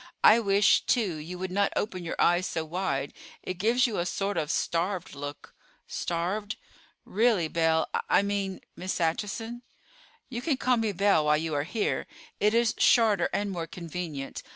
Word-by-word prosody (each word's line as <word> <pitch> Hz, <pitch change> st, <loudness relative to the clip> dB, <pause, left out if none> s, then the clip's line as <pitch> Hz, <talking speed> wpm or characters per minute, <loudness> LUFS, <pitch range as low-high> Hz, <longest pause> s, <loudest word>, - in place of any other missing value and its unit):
I 220 Hz, -, +8 dB
wish, 200 Hz, -2 st, +4 dB
too, 205 Hz, -10 st, +1 dB
you 165 Hz, +4 st, -7 dB
would 185 Hz, 0 st, -4 dB
not 200 Hz, +1 st, +1 dB
open 185 Hz, -4 st, -2 dB
your 170 Hz, -, -5 dB
eyes 175 Hz, +2 st, +3 dB
so 160 Hz, -1 st, -3 dB
wide. 155 Hz, -5 st, -2 dB, 0.3 s
It 185 Hz, -1 st, -5 dB
gives 235 Hz, +6 st, +3 dB
you 230 Hz, -7 st, -1 dB
a 175 Hz, -, 0 dB
sort 200 Hz, +2 st, -2 dB
of 155 Hz, -3 st, -1 dB
starved 175 Hz, +2 st, -1 dB
look." 145 Hz, +1 st, -8 dB, 0.3 s
"Starved? 190 Hz, +5 st, -2 dB, 0.5 s
Really, 215 Hz, -5 st, +2 dB
Belle—I 160 Hz, +3 st, +1 dB
mean 200 Hz, -2 st, -2 dB
Miss 185 Hz, +1 st, -3 dB
Acheson." 210 Hz, +8 st, -2 dB, 0.7 s
"You 240 Hz, -2 st, -5 dB
can 275 Hz, 0 st, 0 dB
call 255 Hz, -1 st, +2 dB
me 225 Hz, -2 st, 0 dB
Belle 195 Hz, -4 st, +3 dB
while 150 Hz, 0 st, +4 dB
you 160 Hz, 0 st, -3 dB
are 145 Hz, 0 st, 0 dB
here; 210 Hz, +5 st, -1 dB, 0.3 s
it 210 Hz, +2 st, +3 dB
is 235 Hz, -1 st, +3 dB
shorter 215 Hz, -7 st, +4 dB
and 205 Hz, 0 st, -1 dB
more 170 Hz, -3 st, -4 dB
convenient. 165 Hz, -4 st, -6 dB
185 Hz, 165 wpm, -28 LUFS, 165-210 Hz, 0.7 s, I